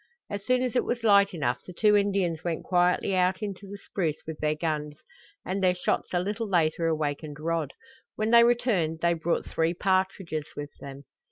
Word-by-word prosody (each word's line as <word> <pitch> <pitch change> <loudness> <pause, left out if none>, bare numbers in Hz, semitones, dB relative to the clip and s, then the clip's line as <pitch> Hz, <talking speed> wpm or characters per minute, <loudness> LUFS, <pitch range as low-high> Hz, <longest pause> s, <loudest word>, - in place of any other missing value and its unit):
As 205 -1 -4
soon 255 +2 +2
as 255 -1 -2
it - - +3
was 240 -1 -3
light 200 -2 +5
enough 125 -8 -2
the 180 - -10
two 210 +3 +4
Indians 195 -5 +1
went 170 -2 -2
quietly 180 +1 +2
out 185 +2 +1
into 200 -1 -6
the 200 - -7
spruce 170 -6 -2
with 160 -1 -7
their 155 0 0
guns, 150 -2 -3 0.5
and 190 +1 -2
their 180 -1 +4
shots 180 - -1
a 175 - +1
little 205 +4 -3
later 165 -2 +1
awakened 150 -1 -2
Rod. 160 -2 -2 0.4
When 215 +1 -1
they 235 0 +8
returned 210 -10 +1
they 170 0 +3
brought 170 +1 -1
three 165 +2 0
partridges 185 -5 -1
with 145 0 -6
them. 140 0 -9
180 Hz, 190 wpm, -27 LUFS, 155-200 Hz, 0.5 s, they